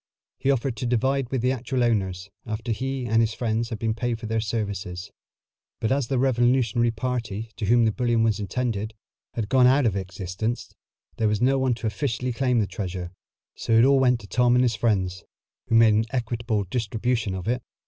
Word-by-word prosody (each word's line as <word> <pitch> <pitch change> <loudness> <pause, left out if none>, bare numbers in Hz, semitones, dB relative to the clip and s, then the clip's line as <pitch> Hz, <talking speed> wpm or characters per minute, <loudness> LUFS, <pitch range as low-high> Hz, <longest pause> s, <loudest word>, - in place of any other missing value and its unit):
He 135 - 0
offered 135 -2 +1
to 125 - -2
divide 130 +2 +1
with 130 -3 -2
the 125 - +3
actual 130 0 -1
owners, 95 -4 -1 0.2
after 110 +2 -3
he 130 +3 -2
and 115 0 +3
his 115 0 0
friends 115 -1 -1
had 115 - -4
been 110 +1 -1
paid 115 0 -2
for 115 - -7
their 110 +1 -1
services, 100 -5 -4 0.7
but 110 - -1
as 135 -2 +1
the 135 - 0
revolutionary 120 -2 +2
party 115 -2 -3
to 110 - -2
whom 120 +1 +5
the 110 - +3
bullion 120 -1 +1
was 110 -2 +1
intended 110 0 -2 0.4
had 115 -3 -2
gone 125 +2 +5
out 135 +1 +4
of 105 -4 +1
existence, 95 +4 -4 0.4
there 110 - +1
was 105 -1 +1
no 135 +3 +3
one 130 -2 +1
to 115 - -7
officially 125 +2 -2
claim 125 0 +1
the 110 - +3
treasure, 90 -3 -5 0.4
so - - -2
it 115 +2 +6
all 135 0 +5
went 125 -2 +3
to 100 - -12
Tom 125 +3 +3
and 125 - +4
his 120 -2 +2
friends, 95 -5 0 0.4
who 115 - +1
made 115 -1 +6
an 110 +1 +2
equitable 115 -3 -1
distribution 110 0 -1
of 95 +2 -6
it. 125 +2 0
115 Hz, 200 wpm, -25 LUFS, 105-125 Hz, 0.7 s, it